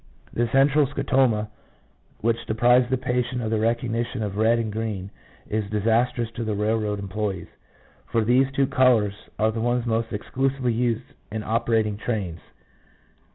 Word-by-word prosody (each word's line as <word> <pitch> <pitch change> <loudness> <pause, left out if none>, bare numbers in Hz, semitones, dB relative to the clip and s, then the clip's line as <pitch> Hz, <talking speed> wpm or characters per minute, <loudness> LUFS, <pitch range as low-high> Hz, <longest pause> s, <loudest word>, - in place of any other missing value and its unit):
This 120 0 0
central 140 +2 +4
scotoma, 125 -6 +1 0.7
which 115 +1 0
deprives 120 +3 +4
the 130 - +1
patient 125 0 -1
of 110 - -2
the 110 - +1
recognition 115 +1 -1
of 100 -2 -3
red 110 +2 +3
and 110 -2 -2
green, 105 -3 -3 0.4
is 105 -1 -2
disastrous 115 +2 +1
to 115 +1 -5
the 110 -2 -1
railroad 105 0 0
employees, 100 -2 -3 0.6
for 115 - +1
these 130 +3 +3
two 135 0 +2
colours 125 -6 +3 0.2
are 110 0 +2
the 110 0 -3
ones 120 +1 0
most 115 0 -1
exclusively 130 +3 -1
used 120 0 0 0.3
in 110 0 -3
opera 115 0 +1
ting 105 -1 -3
trains. 100 -7 -3
115 Hz, 155 wpm, -24 LUFS, 110-125 Hz, 0.7 s, central